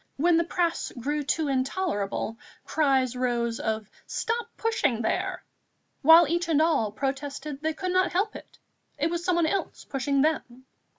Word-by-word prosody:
When 335 +4 +4
the 335 - +3
press 340 0 -1
grew 295 +5 -1
too 300 +2 0
intolerable, 255 - -1 0.3
cries 265 -5 +2
rose 240 -2 -1
of 220 -1 -2 0.2
"Stop 465 +1 -2
pushing 295 - 0
there!" - - -1 0.6
while 325 +2 +8
each 340 +2 -1
and 310 -3 +3
all 310 -10 +2
protested 275 +4 -4
they 315 0 0
could 370 +2 -2
not 370 +1 +2
help 400 +4 0
it - - -12 0.4
it 310 +3 0
was 345 0 -2
someone 345 -2 +2
else 390 +5 -2
pushing 275 0 0
them. 260 -5 -2
295 Hz, 155 wpm, -27 LUFS, 255-340 Hz, 0.6 s, while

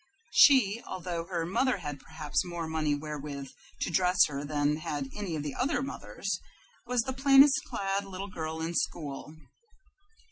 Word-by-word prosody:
She, 235 -6 +6
although 175 -2 -4
her 170 -3 -2
mother 240 +8 +1
had 145 -1 -6
perhaps 155 +1 -2
more 175 -2 -4
money 155 -2 0
wherewith 145 -2 -6 0.3
to - - -1
dress 180 +1 +2
her 140 -1 -4
than 145 0 0
had 145 -3 -4
any 200 -6 -3
of 150 - -3
the 145 - -4
other 275 +2 0
mothers, 275 - -4 0.5
was 250 -1 +2
the 260 - -3
plainest 270 +1 +6
clad 195 0 -2
little 195 0 -6
girl 160 -3 -5
in 165 +1 -2
school. 150 -2 -3
170 Hz, 155 wpm, -29 LUFS, 150-200 Hz, 0.5 s, She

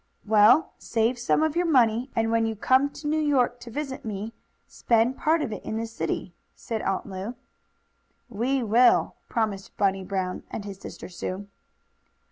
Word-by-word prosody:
"Well, 215 +8 +5
save 235 +2 0
some 240 +5 +2
of 315 0 0
your 350 0 +1
money, 245 -4 +3
and 225 0 +1
when 230 0 +2
you 225 - -2
come 260 +6 +3
to 295 +1 -8
New 310 +1 +1
York 260 -5 +2
to 240 - -10
visit 270 +2 -5
me 205 -3 -4
you 220 - -6
can - - -40 0.3
spend 235 +2 +1
part 315 0 +2
of 220 - -3
it - - -7
in 220 - -3
the 225 - -2
city," 180 -5 -4 0.2
said 225 -2 -4
Aunt 195 0 -1
Lu. 195 +5 -6 0.9
"We 250 +3 -1
will," 235 +3 +4 0.2
promised 215 -4 -2
Bunny 195 -1 +1
Brown 185 -1 -3
and 205 - -6
his 195 -2 -8
sister - - -9
Sue. 185 +2 -5
225 Hz, 180 wpm, -26 LUFS, 205-260 Hz, 0.9 s, Well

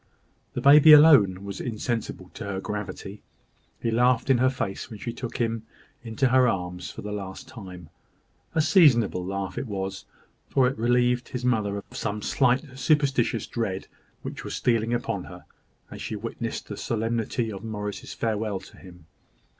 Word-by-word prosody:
The - - -2
baby 150 +2 +9
alone 135 - +7
was 100 -1 -6
insensible 115 -5 -4
to - - -7
her 100 -2 -3
gravity; 105 0 -6 0.6
he 115 - -1
laughed 125 +2 +3
in 125 - +4
her 130 +1 +4
face 115 -7 -4
when 110 - -8
she 115 +3 -5
took 120 -1 -6
him 115 -2 -1 0.4
into 120 +3 0
her 130 0 +5
arms 90 -4 -3
for - - -9
the 105 - -5
last 100 -2 -6
time; 90 -8 -10 0.7
a 160 - +4
seasonable 135 - +4
laugh 95 0 -4
it 135 - -5
was, 95 -2 -4 0.4
for 130 -2 +3
it 135 - -1
relieved 120 +2 +2
his 125 0 -4
mother 105 -5 +1
of 100 - -6
some 105 -1 -4
slight 130 +1 +1
superstitious 140 -5 +2
dread 100 -5 -3 0.4
which - - -6
was - - -5
stealing 115 -2 +1
upon 115 -5 -2
her, 90 -2 -12 0.5
as - - -8
she - - -4
witnessed - - -5
the - - -6
solemnity 115 0 -1
of 100 0 -8
Morris's 105 -2 -5
farewell 110 -3 -1
to - - -15
him. 90 -3 -14
115 Hz, 165 wpm, -26 LUFS, 100-125 Hz, 0.7 s, baby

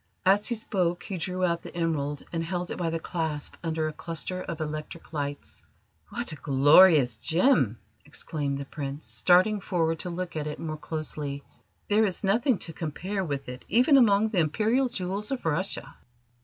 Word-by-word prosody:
As 200 +2 +4
he 235 - 0
spoke 180 -5 -1
he 195 - -5
drew 185 +2 -1
out 170 -1 0
the - - -11
emerald, 150 -4 -1
and 165 -1 -1
held 180 +1 -3
it - - -4
by 170 -2 -1
the 165 0 -2
clasp 160 -3 -3
under 160 -1 -1
a 155 - -4
cluster 165 +4 -3
of 170 -4 -5
electric 155 +2 -6
lights. 145 -1 -4 0.5
"What 240 -5 -2
a 155 - -7
glorious 145 -2 +6
gem!" 160 - +2 0.3
exclaimed 145 -1 -4
the 140 - -5
Prince, 140 +1 -6
starting 190 +4 +3
forward 165 -4 0
to 180 - -3
look 175 0 -5
at 150 -1 -2
it 150 - -4
more 155 -1 -5
closely. 150 -2 -5 0.4
"There 210 +2 +4
is 190 -1 -3
nothing 225 +5 +2
to 165 - -8
compare 180 +6 -3
with 140 -5 -4
it 125 0 -8
even 255 +6 +5
among 220 -4 +5
the 205 -5 0
Imperial 220 - +2
jewels 200 -1 -1
of 270 -7 -3
Russia." 165 +5 -2
170 Hz, 180 wpm, -27 LUFS, 150-195 Hz, 0.5 s, glorious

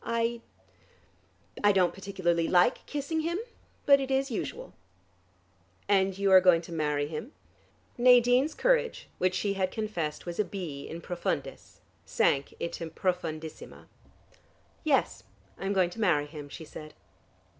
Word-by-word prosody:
I 230 0 -1 1.2
I 205 - +6
don't 185 -3 +2
particularly 185 -4 -1
like 180 +7 +3
kissing 295 +2 -2
him. 335 +2 -1 0.5
But 280 -1 +7
it 270 -1 -3
is 270 0 0
usual." - - -5 1.1
"And 195 -1 +2
you 200 -1 +1
are 185 -1 +9
going 175 -2 +5
to 170 - -11
marry 150 -3 0
him?" 160 - -7 0.7
Nadine's 250 +4 +5
courage - - +1
which 185 0 +1
she 200 0 0
had 190 -1 0
confessed 185 -8 -4
was 175 +1 -6
a - - +4
B. 170 -9 -6
in 165 +1 -7
profundis, 175 0 -4 0.2
sank 140 0 +1
into 170 -1 -4
profundissima. 160 -3 -4 1.0
"Yes, - - +1 0.4
I 195 - -4
am 200 - 0
going 185 -3 +2
to 225 - -7
marry 160 -8 +3
him," 145 -1 -9
she 160 - -9
said. 155 0 -11
190 Hz, 140 wpm, -29 LUFS, 165-230 Hz, 1.2 s, are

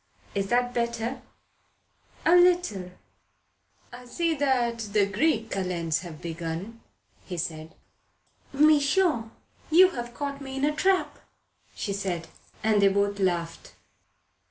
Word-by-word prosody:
"Is 195 -1 -1
that 245 +2 +1
better?" 235 +1 -2 1.0
"A 340 - +6
little." 350 - +3 1.0
"I 250 +1 -10
see 330 +7 -1
the 235 -7 +1
Greek 225 -2 +1
Kalends 175 -4 -1
have 170 -4 -9
begun," 170 +7 -5 0.6
said 160 -1 -5 0.8
he. 275 - -10
"Mechant, 300 - +3 0.4
you 365 +4 +7
have 240 -4 -6
caught 280 0 -4
me 265 -1 -7
in 270 +1 0
a 300 0 0
trap," 375 +3 +1 0.6
said 195 -5 -3
she. - - -21 0.3
And 215 -2 +3
they 200 - +6
both 200 +1 +1
laughed. 170 -3 -2
230 Hz, 115 wpm, -26 LUFS, 190-280 Hz, 1.0 s, you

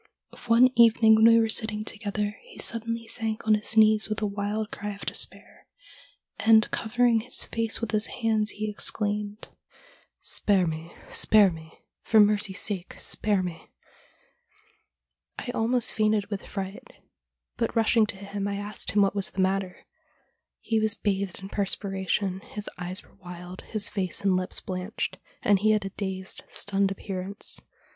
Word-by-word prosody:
One 240 +2 +6
evening 230 -1 +6
when 220 +1 +6
we 230 0 +7
were 225 - +2
sitting 220 -1 -2
together 210 +1 -3
he - - -16
suddenly 230 0 -2
sank 225 -1 -4
on 215 - +4
his 210 +1 -1
knees 215 0 +5
with 215 - -2
a 215 - -1
wild 205 +1 -3
cry 205 0 -5
of 200 - -10
despair, - - -3 0.7
and 220 -1 +5
covering 240 0 +2
his 245 +3 +1
face 225 0 -2
with 230 -2 -2
his 215 0 0
hands 220 -2 0
he 215 +1 -4
exclaimed: 210 0 -1 0.4
" - - -31 0.2
Spare 195 -3 +3
me, 160 0 -5 0.2
spare 210 -3 +5
me, 160 -1 -12 0.2
for 220 - +3
mercy's 205 -2 +3
sake 190 -4 -2
spare 205 -3 +2
me!" 175 -2 -7 1.7
I 245 - -4
almost 235 +1 +1
fainted 215 -1 +1
with 200 - -5
.fright, 195 0 -6 0.7
but - - -1
rushing 225 -1 +4
to - - -5
him 200 0 -4
I 200 - -2
asked 205 +1 -3
him 205 -1 +5
what 195 - +1
was 200 -2 +1
the - - -9
matter. 190 -1 -1 0.8
He 225 -1 0
was 215 0 +3
bathed 195 -3 -2
in 195 - -7
perspiration, 195 -1 -1
his 210 +1 -7
eyes 180 +2 -4
were - - -23
wild, 180 +1 -9
his 215 -2 0
face 185 -4 -2
and 195 -2 +2
lips 185 0 -2
blanched, 185 +3 -4 0.2
and 205 -2 +4
he 215 +2 +3
had 210 -2 0
a - - -3
dazed, 190 -1 -5
stunned 195 -1 0
appearance. 195 +1 -4
210 Hz, 160 wpm, -26 LUFS, 195-220 Hz, 1.7 s, we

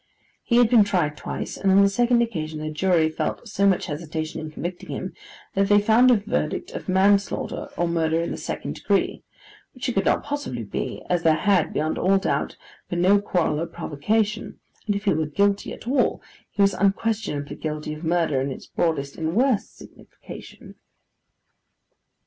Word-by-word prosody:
He 235 - 0
had 245 -1 +6
been 225 -2 +6
tried 175 -7 0
twice; - - -5
and 195 - +2
on 195 +1 +6
the - - +6
second 240 +3 +3
occasion 160 -9 -4
the 155 0 -4
jury 165 0 +2
felt 160 +8 -3
so 200 -2 +1
much 190 -2 +2
hesitation 155 +1 -4
in 155 - -6
convicting 175 +3 -6
him, - - -5 0.4
that 195 +1 +1
they 205 0 +6
found 225 +4 +5
a 250 - +7
verdict 200 -7 -2
of - - -7
manslaughter, 195 +2 +1
or 175 - +1
murder 165 -1 +1
in 170 - -2
the - - -4
second - - -4
degree; - - 0 0.5
which 255 +2 -4
it - - +1
could 195 -2 0
not - - +2
possibly 285 - -4
be, 100 - -5
as 175 -1 +1
there 160 -2 +4
had, 190 -2 +2
beyond 155 +1 -1
all 195 +2 +3
doubt, 195 - -1 0.3
been 175 0 0
no 200 +2 +5
quarrel 175 -6 0
or 170 - -2
provocation, 205 +7 -2 0.3
and 205 - +1
if 200 - -3
he 200 - +3
were 155 0 0
guilty 200 +6 +1
at - - -10
all, 260 0 +2 0.3
he 200 - +1
was 195 0 +4
unquestionably 200 -6 -1
guilty 155 -1 -4
of 155 +2 -9
murder 160 -5 +1
in 135 - -1
its - - -8
broadest 145 -5 -1
and 160 +1 -2
worst 250 -2 +1
signification. - - -13
185 Hz, 185 wpm, -24 LUFS, 160-205 Hz, 0.5 s, a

